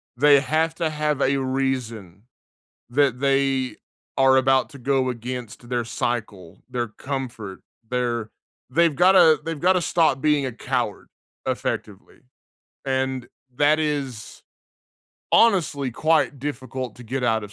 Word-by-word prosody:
They 145 Hz, +2 st, +6 dB
have 160 Hz, +2 st, 0 dB
to 165 Hz, -2 st, -1 dB
have 150 Hz, -2 st, -1 dB
a 140 Hz, +1 st, +2 dB
reason 125 Hz, -8 st, -3 dB, 0.7 s
that 130 Hz, -1 st, +2 dB
they 135 Hz, -1 st, +1 dB, 0.4 s
are 135 Hz, 0 st, +5 dB
about 130 Hz, 0 st, +3 dB
to 140 Hz, -3 st, -12 dB
go 130 Hz, 0 st, +1 dB
against 120 Hz, 0 st, -6 dB
their 120 Hz, -2 st, -1 dB
cycle, 115 Hz, -6 st, -4 dB
their 120 Hz, -1 st, -2 dB
comfort, 120 Hz, -5 st, -6 dB, 0.3 s
their 120 Hz, -3 st, -2 dB, 0.4 s
they've 165 Hz, +2 st, +3 dB
gotta 175 Hz, -3 st, +6 dB
they've 165 Hz, -3 st, -4 dB
gotta 185 Hz, 0 st, +3 dB
stop 160 Hz, -6 st, +2 dB
being 150 Hz, -3 st, +2 dB
a 130 Hz, -, -4 dB
coward, 115 Hz, -, -3 dB, 0.4 s
effectively. -, -, -4 dB, 0.7 s
And 130 Hz, -1 st, -1 dB, 0.3 s
that 150 Hz, +2 st, +4 dB
is 140 Hz, -7 st, -3 dB, 0.9 s
honestly 160 Hz, -, +3 dB
quite 145 Hz, +1 st, +1 dB
difficult 130 Hz, -3 st, -5 dB
to 125 Hz, -, -11 dB
get 125 Hz, +3 st, -4 dB
out 110 Hz, -3 st, +1 dB
of 105 Hz, -, -11 dB
130 Hz, 125 wpm, -23 LUFS, 120-150 Hz, 0.9 s, They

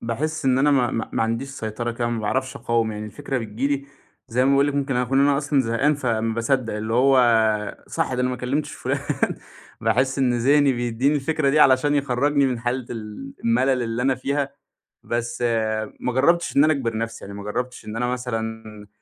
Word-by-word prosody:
باحِس 150 Hz, +8 st, -3 dB
إن 130 Hz, -1 st, +3 dB
أنا 145 Hz, +2 st, +4 dB
ما 130 Hz, -4 st, +3 dB
ما 115 Hz, -, -3 dB
ما -, -, +1 dB
عنديش 115 Hz, +4 st, -2 dB
سيطرة 120 Hz, -2 st, -4 dB
كده 120 Hz, 0 st, -2 dB
ما 115 Hz, -1 st, -2 dB
باعرفش 130 Hz, +5 st, -1 dB
أقاوم، 115 Hz, -2 st, 0 dB
يعني 105 Hz, 0 st, -6 dB
الفكرة 120 Hz, +6 st, -4 dB
بتيجي 115 Hz, +3 st, -3 dB
لي 140 Hz, -1 st, -1 dB, 0.4 s
زي 125 Hz, +2 st, +1 dB
ما 135 Hz, -, +3 dB
باقول 140 Hz, +1 st, +4 dB
لِك 145 Hz, -, -1 dB
ممكن 140 Hz, -2 st, 0 dB
أكون 125 Hz, +2 st, +2 dB
أنا 140 Hz, 0 st, +4 dB
أصلًا 145 Hz, -1 st, +1 dB
زهقان، 130 Hz, +5 st, +1 dB
فما 115 Hz, -5 st, -1 dB
باصدَّق 115 Hz, -1 st, 0 dB
اللي 110 Hz, +1 st, -3 dB
هو 130 Hz, +2 st, +5 dB, 0.7 s
صح -, -, -1 dB
ده 125 Hz, -, -1 dB
أنا 125 Hz, -, +1 dB
ما 125 Hz, -, -3 dB
كلِّمتش 135 Hz, +5 st, -2 dB
فُلان. -, -, -2 dB, 0.8 s
باحِس 130 Hz, +2 st, +1 dB
إن 125 Hz, -2 st, +2 dB
ذِهني 140 Hz, +3 st, +4 dB
بيدّيني 120 Hz, +4 st, 0 dB
الفكرة 150 Hz, 0 st, +1 dB
دي 150 Hz, +2 st, +3 dB
علشان 135 Hz, +2 st, +5 dB
يخرَّجني 140 Hz, +1 st, +2 dB
من 125 Hz, -2 st, -1 dB
حالة 120 Hz, 0 st, -2 dB
ال 115 Hz, +4 st, -7 dB
المَلَل 125 Hz, +2 st, +2 dB
اللي 115 Hz, +1 st, -2 dB
أنا 135 Hz, 0 st, +2 dB
فيها، 140 Hz, +2 st, -2 dB, 0.5 s
بس 120 Hz, +1 st, -3 dB, 0.6 s
ما 125 Hz, -, -1 dB
جرَّبتش 170 Hz, +7 st, +2 dB
إن 140 Hz, -, +6 dB
أنا 155 Hz, -, +4 dB
أجبِر 115 Hz, -6 st, -2 dB
نَفْسي، 115 Hz, 0 st, -5 dB
يعني 100 Hz, 0 st, -8 dB
ما 100 Hz, -, -8 dB
جرَّبتش 125 Hz, +4 st, -4 dB
إن 110 Hz, +1 st, -6 dB
أنا 125 Hz, +1 st, 0 dB
مثلًا 110 Hz, -4 st, -4 dB
125 Hz, 200 wpm, -23 LUFS, 115-140 Hz, 0.8 s, إن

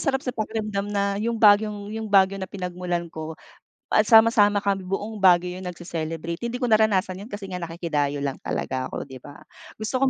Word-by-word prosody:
sarap 270 Hz, -1 st, 0 dB
sa 250 Hz, -, -2 dB
pakiramdam 215 Hz, -3 st, -3 dB
na 200 Hz, 0 st, -1 dB
yung 230 Hz, +1 st, -1 dB
Baguiong 210 Hz, -1 st, +3 dB
yung 220 Hz, 0 st, -4 dB
Baguio 195 Hz, -1 st, +4 dB
na 190 Hz, -, -5 dB
pinagmulan 180 Hz, -2 st, -4 dB
ko, 160 Hz, 0 st, -6 dB, 0.6 s
ah, 215 Hz, -, +6 dB
sama-sama 220 Hz, -1 st, +5 dB
kami 200 Hz, -1 st, 0 dB
buong 205 Hz, +3 st, -4 dB
Baguio 180 Hz, 0 st, +4 dB
yun 180 Hz, -, -4 dB
nagce-celebrate. 165 Hz, -1 st, -5 dB
Hindi 235 Hz, +1 st, -3 dB
ko 250 Hz, -, -1 dB
naranasan 205 Hz, -4 st, +2 dB
yun 215 Hz, -, -10 dB
kasi 205 Hz, -1 st, -6 dB
nga 180 Hz, -1 st, -6 dB
nakikidayo 150 Hz, -4 st, -2 dB
lang 135 Hz, -, -4 dB
talaga 130 Hz, 0 st, -3 dB
ako, -, -, -5 dB
di 130 Hz, -2 st, -11 dB
ba? 145 Hz, +2 st, -12 dB, 0.4 s
Gusto 220 Hz, +5 st, -2 dB
ko 270 Hz, -, +4 dB
195 Hz, 190 wpm, -24 LUFS, 175-215 Hz, 0.6 s, ah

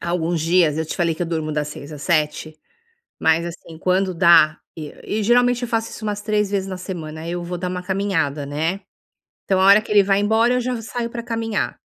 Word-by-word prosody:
alguns 170 Hz, -1 st, -1 dB
dias 165 Hz, -2 st, +3 dB
eu 160 Hz, -, -1 dB
te -, -, -5 dB
falei 170 Hz, -3 st, +1 dB
que 175 Hz, -, -4 dB
eu -, -, -2 dB
durmo 160 Hz, -2 st, -2 dB
das 150 Hz, 0 st, -2 dB
6 150 Hz, 0 st, -9 dB
às 150 Hz, 0 st, -9 dB
7, 155 Hz, -1 st, -1 dB, 0.6 s
mas 160 Hz, +1 st, +2 dB
assim, 165 Hz, -1 st, -9 dB
quando 185 Hz, +1 st, +1 dB
dá, 165 Hz, -3 st, +5 dB, 0.2 s
e 150 Hz, -2 st, -7 dB
e 215 Hz, 0 st, -2 dB
geralmente 245 Hz, +2 st, +3 dB
eu -, -, -2 dB
faço 225 Hz, -1 st, -1 dB
isso 215 Hz, -, -8 dB
umas 205 Hz, -1 st, -3 dB
3 210 Hz, -1 st, 0 dB
vezes 195 Hz, -1 st, -1 dB
na 185 Hz, -, -5 dB
semana, 160 Hz, -3 st, -7 dB
eu 175 Hz, 0 st, -3 dB
vou 180 Hz, +1 st, -5 dB
dar 180 Hz, +1 st, -3 dB
uma 180 Hz, 0 st, -4 dB
caminhada, 170 Hz, -7 st, -1 dB
né. 160 Hz, +7 st, -2 dB, 0.6 s
Então, 190 Hz, -1 st, +1 dB
a 190 Hz, -, +4 dB
hora 200 Hz, +2 st, +7 dB
que 215 Hz, -, -10 dB
ele 205 Hz, -1 st, +6 dB
vai 195 Hz, 0 st, +2 dB
embora 220 Hz, +4 st, +3 dB
eu 250 Hz, -, +1 dB
já 250 Hz, -1 st, -2 dB
saio 235 Hz, +1 st, -4 dB
para 235 Hz, 0 st, -6 dB
caminhar. 225 Hz, -2 st, -2 dB
180 Hz, 225 wpm, -21 LUFS, 160-210 Hz, 0.6 s, hora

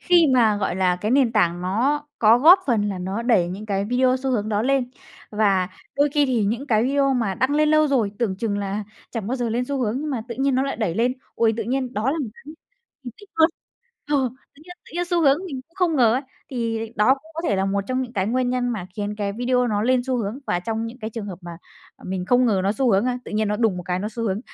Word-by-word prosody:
khi 350 Hz, -3 st, +4 dB
mà, 220 Hz, -4 st, +4 dB
gọi 195 Hz, -2 st, -2 dB
là, 180 Hz, -1 st, +2 dB
cái 210 Hz, +5 st, -3 dB
nền 255 Hz, -3 st, +3 dB
tảng 175 Hz, -5 st, +2 dB
nó 250 Hz, +11 st, 0 dB, 0.2 s
có 225 Hz, +1 st, +6 dB
góp 335 Hz, +9 st, +8 dB
phần 215 Hz, -5 st, +1 dB
là 195 Hz, -2 st, -4 dB
nó 190 Hz, +5 st, -3 dB
đẩy 220 Hz, -8 st, +3 dB
những 200 Hz, +4 st, -7 dB
cái 200 Hz, -1 st, -1 dB
video 255 Hz, +3 st, +2 dB
xu 265 Hz, +1 st, -3 dB
hướng 215 Hz, -4 st, -1 dB
đó 210 Hz, 0 st, 0 dB
lên. 260 Hz, -1 st, +1 dB, 0.4 s
Và 200 Hz, -4 st, +2 dB, 0.3 s
đôi 285 Hz, +1 st, +3 dB
khi 290 Hz, -2 st, +3 dB
thì 240 Hz, -5 st, +1 dB
những 235 Hz, +7 st, -2 dB
cái 220 Hz, -5 st, +2 dB
video 275 Hz, 0 st, +2 dB
mà 225 Hz, -6 st, 0 dB
đăng 260 Hz, +6 st, 0 dB
lên 305 Hz, 0 st, +3 dB
lâu 310 Hz, 0 st, +4 dB
rồi, 230 Hz, -8 st, +1 dB
tưởng 210 Hz, -6 st, -1 dB
chừng 205 Hz, -1 st, -2 dB
là 200 Hz, +1 st, -3 dB, 0.3 s
chẳng 225 Hz, -4 st, -4 dB
bao 255 Hz, -, -1 dB
giờ 240 Hz, -2 st, -1 dB
lên 240 Hz, +3 st, -1 dB
xu 275 Hz, +1 st, -3 dB
hướng 235 Hz, +4 st, -1 dB
nhưng 305 Hz, 0 st, -3 dB
mà 245 Hz, -5 st, -2 dB
tự 235 Hz, -, -4 dB
nhiên 270 Hz, -1 st, +2 dB
nó 260 Hz, -, +2 dB
lại 275 Hz, -, -2 dB
đẩy 215 Hz, -7 st, -1 dB
lên. 240 Hz, +3 st, +1 dB, 0.2 s
Ôi, 225 Hz, -1 st, +2 dB
tự 225 Hz, -, -2 dB
nhiên 255 Hz, +2 st, -2 dB
đó 220 Hz, +5 st, 0 dB
là 320 Hz, -, -2 dB
một 270 Hz, -, -3 dB
cái -, -, -18 dB, 0.6 s
mình 245 Hz, -, -7 dB
tích 410 Hz, -, -15 dB
cực. 320 Hz, +1 st, +4 dB, 0.6 s
Ờ, 295 Hz, -, +3 dB, 0.4 s
tự 295 Hz, -, -18 dB
nhiên 355 Hz, 0 st, -11 dB
tự -, -, -15 dB
nhiên 350 Hz, +1 st, 0 dB
xu 350 Hz, -1 st, 0 dB
hướng 280 Hz, -1 st, +4 dB
mình 270 Hz, -6 st, -5 dB
cũng 335 Hz, -, -34 dB
không 360 Hz, -5 st, +1 dB
ngờ 230 Hz, -3 st, +5 dB
ấy, 260 Hz, -, -1 dB, 0.3 s
thì 230 Hz, -3 st, -2 dB, 0.2 s
đó 215 Hz, +6 st, +5 dB
cũng 310 Hz, +4 st, -18 dB
có 330 Hz, -, -3 dB
thể 200 Hz, -, +1 dB
là 190 Hz, -, +1 dB
một 200 Hz, +1 st, 0 dB
trong 255 Hz, 0 st, 0 dB
những 245 Hz, -2 st, -7 dB
cái 190 Hz, -2 st, -1 dB
nguyên 250 Hz, +2 st, 0 dB
nhân 250 Hz, -1 st, 0 dB
mà 215 Hz, -7 st, -3 dB
khiến 205 Hz, 0 st, -3 dB
cái 200 Hz, -1 st, -2 dB
video 250 Hz, +2 st, +1 dB
nó 210 Hz, -3 st, 0 dB
lên 255 Hz, +1 st, +3 dB
xu 260 Hz, -, 0 dB
hướng, 225 Hz, +1 st, -3 dB
và 175 Hz, -, 0 dB
trong 225 Hz, +3 st, -3 dB
những 235 Hz, +3 st, -9 dB
cái 220 Hz, +1 st, -4 dB
trường 220 Hz, -2 st, -6 dB
hợp 185 Hz, -4 st, -7 dB
mà, 175 Hz, -, -9 dB, 0.5 s
à, -, -, -18 dB
mình 185 Hz, -1 st, -3 dB
không 250 Hz, 0 st, +4 dB
ngờ 200 Hz, -4 st, +2 dB
nó 200 Hz, -, +2 dB
xu 245 Hz, +2 st, +1 dB
hướng, 195 Hz, +4 st, +3 dB
a, 250 Hz, 0 st, -1 dB
tự -, -, -9 dB
nhiên 215 Hz, 0 st, 0 dB
nó 210 Hz, -, 0 dB
đùng 220 Hz, -5 st, +1 dB
một 180 Hz, -, -5 dB
cái 180 Hz, -1 st, -1 dB
nó 205 Hz, -, -3 dB
xu 230 Hz, +1 st, -6 dB
hướng. 210 Hz, -1 st, -1 dB
235 Hz, 285 wpm, -23 LUFS, 205-265 Hz, 0.6 s, góp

